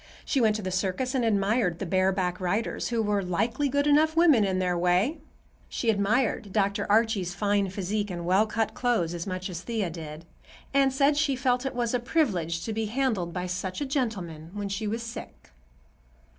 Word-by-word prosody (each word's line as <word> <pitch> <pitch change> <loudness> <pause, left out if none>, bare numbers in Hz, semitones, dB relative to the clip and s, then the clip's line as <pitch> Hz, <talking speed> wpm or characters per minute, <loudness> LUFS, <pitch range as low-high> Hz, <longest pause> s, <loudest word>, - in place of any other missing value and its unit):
She 275 - +1
went 215 -2 +3
to 215 - -4
the 185 - -3
circus 190 +8 -1
and 260 -3 +1
admired 205 -3 +1
the 195 - -4
bareback 185 0 +1
riders, 200 +5 -1
who 230 -2 0
were 205 -1 +1
"likely 220 +10 0
good 285 +2 +1
enough 305 +2 +4
women 310 -10 +6
in 190 -2 0
their 180 -1 0
way." 180 - +2 0.5
She 230 - +1
admired 210 0 0
Dr. 200 0 0
Archie's 210 -5 +2
fine 200 -1 +1
physique 205 +2 -2
and 175 -2 -5
well 190 +5 +3
cut 220 +1 -1
clothes 225 -9 0
as 170 +1 -5
much 185 -1 -3
as 175 -3 -6
Thea 215 -5 -2
did, 160 -1 -8 0.5
and 275 -1 +4
said 280 +2 +3
she 295 -3 +2
"felt 250 +1 0
it 270 - -5
was 240 -1 -1
a 250 - +2
privilege 185 - 0
to 225 - -3
be 220 0 -1
handled 220 -7 -1
by 180 +1 -3
such 185 +1 -4
a 290 - -1
gentleman 195 - -3
when 205 -1 -3
she 210 +2 -3
was 225 +3 -2
sick." 230 - -9
205 Hz, 195 wpm, -27 LUFS, 185-245 Hz, 0.5 s, women